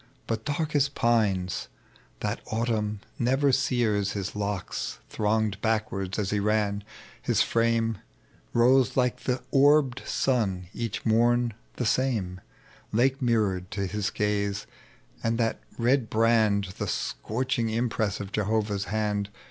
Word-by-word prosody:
But 110 Hz, -1 st, -3 dB
dark 150 Hz, +1 st, -1 dB
as 145 Hz, -1 st, +4 dB
pines 105 Hz, -8 st, +1 dB, 0.5 s
that -, -, -2 dB
autumn 110 Hz, -2 st, -1 dB, 0.2 s
never 135 Hz, +3 st, +3 dB
sears 120 Hz, -7 st, +1 dB
His 100 Hz, 0 st, -4 dB
locks 100 Hz, -2 st, -3 dB
thronged 105 Hz, -1 st, 0 dB
backward 100 Hz, -4 st, -1 dB
as 105 Hz, -2 st, -1 dB
he 105 Hz, -, +1 dB
ran, 105 Hz, -1 st, +1 dB, 0.4 s
his -, -, +2 dB
frame 115 Hz, -2 st, +1 dB, 0.5 s
Rose 125 Hz, +1 st, +4 dB
like 125 Hz, -1 st, +1 dB
the 125 Hz, -1 st, -1 dB
orbSd 140 Hz, -2 st, +4 dB
sun 95 Hz, -9 st, 0 dB
each 115 Hz, -3 st, -4 dB
morn 120 Hz, +1 st, +3 dB, 0.2 s
the 125 Hz, -, -2 dB
same, 105 Hz, -7 st, 0 dB, 0.5 s
Lake 130 Hz, +5 st, +2 dB
mirrored 105 Hz, -7 st, +1 dB
to 100 Hz, -2 st, -2 dB
his 100 Hz, +2 st, -1 dB
gaze; 100 Hz, -1 st, -1 dB, 0.6 s
and 115 Hz, 0 st, +1 dB
that 115 Hz, -1 st, 0 dB, 0.2 s
red 125 Hz, 0 st, +2 dB
brand. 110 Hz, -4 st, +2 dB
The -, -, -1 dB
scorching 120 Hz, 0 st, -1 dB
impress 115 Hz, -3 st, 0 dB
of 100 Hz, -1 st, -6 dB
Jehovah's 105 Hz, -1 st, 0 dB
hand. 105 Hz, -1 st, -1 dB
110 Hz, 125 wpm, -27 LUFS, 100-120 Hz, 0.6 s, as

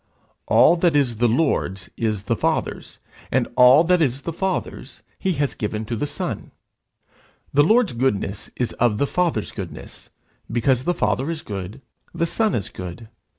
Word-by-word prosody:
All 125 Hz, +10 st, +5 dB
that 170 Hz, -2 st, +2 dB
is 130 Hz, -6 st, +2 dB
the 120 Hz, +2 st, +3 dB
Lord's 115 Hz, -, 0 dB
is 110 Hz, -3 st, -1 dB
the -, -, 0 dB
Father's, -, -, -2 dB, 0.3 s
and -, -, +2 dB
all 125 Hz, +5 st, +7 dB
that 180 Hz, 0 st, +3 dB
is 135 Hz, -2 st, 0 dB
the 170 Hz, -, -4 dB
Father's 190 Hz, +2 st, -4 dB, 0.2 s
he 190 Hz, -2 st, 0 dB
has 145 Hz, -2 st, -1 dB
given 105 Hz, +1 st, -3 dB
to 115 Hz, -, -3 dB
the 145 Hz, +6 st, -2 dB
Son. -, -, -4 dB, 1.0 s
The 145 Hz, -, +5 dB
Lord's 220 Hz, -, +3 dB
goodness 105 Hz, -5 st, -1 dB
is 125 Hz, -2 st, -2 dB
of 115 Hz, -3 st, +2 dB
the 140 Hz, -, +2 dB
Father's 165 Hz, -8 st, -1 dB
goodness; -, -, -9 dB, 0.4 s
because 125 Hz, +2 st, +1 dB
the 175 Hz, -, +1 dB
Father 135 Hz, 0 st, 0 dB
is 165 Hz, -1 st, -4 dB
good 100 Hz, +5 st, -7 dB, 0.3 s
the 170 Hz, 0 st, +1 dB
Son 215 Hz, +4 st, 0 dB
is 100 Hz, -5 st, -3 dB
good. 95 Hz, +5 st, -8 dB
130 Hz, 165 wpm, -22 LUFS, 110-165 Hz, 1.0 s, all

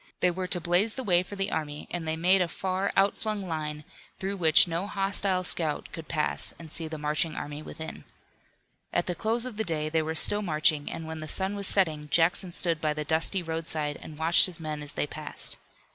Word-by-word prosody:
They 180 Hz, -, +3 dB
were 185 Hz, +1 st, -4 dB
to 180 Hz, -, -1 dB
blaze 180 Hz, +6 st, +2 dB
the 260 Hz, -, -4 dB
way 180 Hz, -5 st, +3 dB
for 185 Hz, +3 st, -8 dB
the 195 Hz, 0 st, -1 dB
army 150 Hz, -1 st, -4 dB
and 170 Hz, -2 st, -3 dB
they 160 Hz, -, 0 dB
made 185 Hz, +4 st, +4 dB
a 180 Hz, -, +2 dB
far 190 Hz, +3 st, -2 dB
out 195 Hz, +1 st, +4 dB
flung 215 Hz, -1 st, -2 dB
line, 150 Hz, -2 st, -4 dB, 0.4 s
through 195 Hz, +1 st, -3 dB
which 160 Hz, -1 st, +6 dB
no 170 Hz, +4 st, -2 dB
hostile 195 Hz, -2 st, 0 dB
scout 160 Hz, -4 st, -1 dB
could 165 Hz, -1 st, -9 dB
pass 155 Hz, -2 st, +1 dB
and 160 Hz, -2 st, -11 dB
see 165 Hz, 0 st, +3 dB
the 155 Hz, 0 st, -6 dB
marching 150 Hz, +2 st, 0 dB
army 145 Hz, +1 st, -6 dB
within. 160 Hz, +1 st, -8 dB, 0.9 s
At -, -, 0 dB
the 180 Hz, -, -2 dB
close 230 Hz, +6 st, 0 dB
of 245 Hz, -5 st, -7 dB
the 220 Hz, -, 0 dB
day 155 Hz, -5 st, -2 dB
they 160 Hz, 0 st, +1 dB
were 160 Hz, +1 st, -3 dB
still 205 Hz, +6 st, +6 dB
marching, 155 Hz, -4 st, +1 dB
and 165 Hz, -, -6 dB
when 160 Hz, 0 st, -6 dB
the 155 Hz, -, -6 dB
sun 190 Hz, +4 st, -2 dB
was 200 Hz, -1 st, -2 dB
setting 155 Hz, -6 st, +2 dB
Jackson 175 Hz, +3 st, +3 dB
stood 170 Hz, -2 st, +2 dB
by 150 Hz, -1 st, 0 dB
the 150 Hz, -, -2 dB
dusty 165 Hz, +5 st, 0 dB
roadside 160 Hz, -2 st, -2 dB
and 155 Hz, -, -10 dB
watched 165 Hz, +4 st, +6 dB
his 175 Hz, -3 st, -7 dB
men 155 Hz, -2 st, -5 dB
as 145 Hz, -1 st, -6 dB
they -, -, -1 dB
passed. 150 Hz, +1 st, -3 dB
165 Hz, 220 wpm, -28 LUFS, 155-190 Hz, 0.9 s, which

